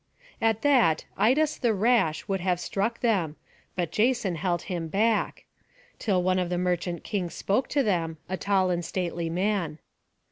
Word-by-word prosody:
At 225 -1 +1
that 250 - +4
Idas 285 +9 +2
the 235 -4 +2
rash 210 -7 +2
would 195 -2 -1
have 180 -1 +1
struck 205 +6 -2
them; 190 -10 +1 0.4
but 175 -3 -1
Jason 235 -4 +1
held 175 +1 -1
him 175 -4 -4
back, 215 +6 0 0.5
till 190 -5 +1
one 185 0 +2
of 180 -1 -1
the 180 - -1
merchant 175 -1 -1
kings 185 -6 -3
spoke 210 +7 0
to 280 - +1
them, 165 -7 0
a 185 - -2
tall 190 -1 +1
and 175 -1 -1
stately 170 -1 -2
man. 180 -3 -1
185 Hz, 165 wpm, -27 LUFS, 175-220 Hz, 0.5 s, that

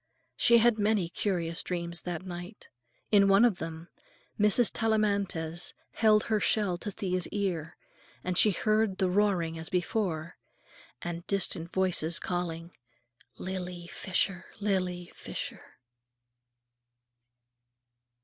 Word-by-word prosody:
She 235 - +5
had 235 -1 +4
many 205 -4 +2
curious 170 -2 -1
dreams 170 -1 -3
that 180 0 -5
night. 180 +3 -8 0.4
In 200 -2 +6
one 195 +4 +6
of 215 -7 +1
them 165 +1 -6 0.5
Mrs. 210 0 +5
Tellamantez 200 -7 0 0.2
held 215 -1 +4
her 215 -2 +1
shell 200 -4 +2
to 205 - -4
Thea's 185 -3 -2
ear, 175 -6 -3 0.5
and 180 0 -2
she 210 - +7
heard 215 0 +1
the 185 -1 +1
roaring, 180 -5 +1
as 160 - -4
before, 175 -3 -2 0.7
and 175 0 -5
distant 175 -3 -1
voices 175 -3 +1
calling, 170 -1 -3 0.7
"Lily 180 -2 -5
Fisher! 185 0 -1
Lily 185 -4 -1
Fisher!" - - -7
185 Hz, 110 wpm, -29 LUFS, 175-205 Hz, 0.7 s, she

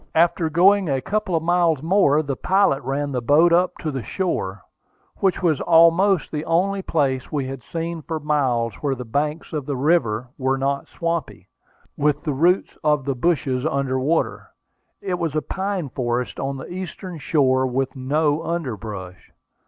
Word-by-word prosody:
After 165 0 +3
going 185 +3 +4
a 135 -1 +1
couple 195 +5 -2
of 160 - 0
miles 170 -4 +2
more, 160 -4 +3
the 140 -2 -3
pilot 190 -3 +2
ran 140 +2 -2
the 125 -2 -2
boat 155 +8 +4
up 180 +1 +2
to 155 - -2
the 135 -2 -3
shore, 100 - -3 0.5
which 190 -1 0
was 160 -5 +2
almost 170 +1 +4
the 150 -1 -3
only 190 +4 +1
place 135 -7 -1
we 145 -3 -1
had 135 -1 -6
seen 165 +5 -5
for 160 +1 -4
miles 130 -7 0
where 140 -2 0
the 125 -1 -7
banks 150 +8 -2
of 150 -4 -3
the 145 - -1
river 125 -6 +1
were 135 0 +1
not 140 +1 -1
swampy, 170 -3 -4 0.5
with 145 0 0
the 150 -4 -1
roots 175 +7 +1
of 150 -3 +2
the 140 - 0
bushes 130 -2 0
under 135 -1 0
water. 155 +6 -1 0.5
It 185 -3 -2
was 160 -3 -2
a 155 - +1
pine 190 -4 -3
forest 120 -1 -2
on 135 0 -3
the 130 - -8
eastern 185 -1 -7
shore, 130 -3 +2
with 135 +2 -2
no 145 +3 0
underbrush. 110 - -5
150 Hz, 170 wpm, -22 LUFS, 130-170 Hz, 0.5 s, going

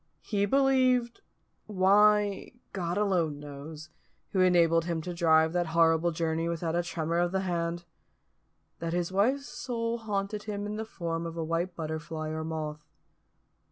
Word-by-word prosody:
He 205 -2 0
believed 255 - +2 0.5
why, 205 +1 +3 0.2
God 175 -1 -2
alone 175 -8 +1
knows, 150 +2 -9 0.4
who 190 - +2
enabled 170 -2 +4
him 170 -1 -1
to 180 - -4
drive 160 -1 +3
that 175 -1 0
horrible 165 0 +4
journey 165 0 -1
without 170 0 -2
a 175 - +2
tremor 170 -1 -2
of 175 0 +1
the 190 0 0
hand 170 -2 -2 0.9
that 165 0 -3
his 175 0 -1
wife's 250 +9 +1
soul 235 -3 -3
haunted 210 -1 -3
him 205 -1 -4
in 210 +1 -4
the 220 - -3
form 170 -5 -4
of 165 0 -7
a 165 - -1
white 170 +2 -2
butterfly 160 0 -4
or 160 0 -3
moth. 155 -2 -4
175 Hz, 155 wpm, -29 LUFS, 165-205 Hz, 0.9 s, enabled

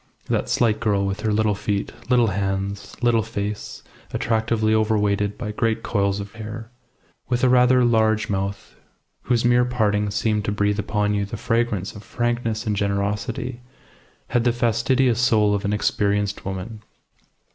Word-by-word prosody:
That - - 0
slight 115 -3 +2
girl, 100 -3 +1
with 100 +1 -2
her 110 0 -1
little 105 0 +2
feet, 100 0 -2 0.2
little 120 -3 +4
hands, 100 +1 -3
little 120 -2 +4
face 105 -2 -5 0.3
attractively 110 -1 +1
overweighted 105 -2 +1
by 105 -4 -4
great 115 +1 -1
coils 100 -2 0
of 100 0 -7
hair; 110 +1 -8 0.6
with 125 0 0
a 130 - +5
rather 125 0 +5
large 110 -2 +2
mouth, 100 0 -3 0.5
whose 120 -2 +1
mere 120 0 +4
parting 105 -4 +1
seemed 105 +1 0
to - - 0
breathe 105 0 0
upon 105 0 0
you 100 0 0
the 100 +3 -5
fragrance 115 -4 -1
of 105 - -10
frankness 120 0 -2
and 105 -1 0
generosity, 100 +5 -2 0.7
had 120 -1 +1
the 120 - +3
fastidious 120 +1 +2
soul 105 -4 +3
of 100 -1 -1
an 100 - 0
experienced 105 -1 0
woman. 95 +3 -5
110 Hz, 155 wpm, -23 LUFS, 100-115 Hz, 0.7 s, a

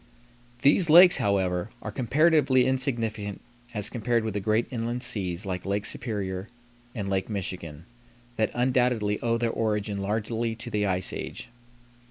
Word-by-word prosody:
These 160 +4 +5
lakes, 180 +3 +8
however, 95 -1 0
are 105 - -4
comparatively 135 +1 +3
insignificant 115 -6 -1 0.4
as 105 -1 -1
compared 120 -1 0
with 110 -2 -3
the 105 - -1
great 110 +3 +1
inland 120 0 -3
seas 100 -7 -1
like 90 -2 -3
Lake 100 +1 -2
Superior 100 -4 -4 0.5
and 100 -4 -3
Lake 95 0 -1
Michigan, 85 -6 -5 0.5
that 110 -1 +1
undoubtedly 125 -4 +1
owe 115 0 +1
their 115 -1 0
origin 105 -3 -1
largely 110 +3 -2
to 115 +1 -8
the 105 -1 0
ice 90 -1 0
age. - - -6
110 Hz, 145 wpm, -26 LUFS, 100-120 Hz, 0.5 s, lakes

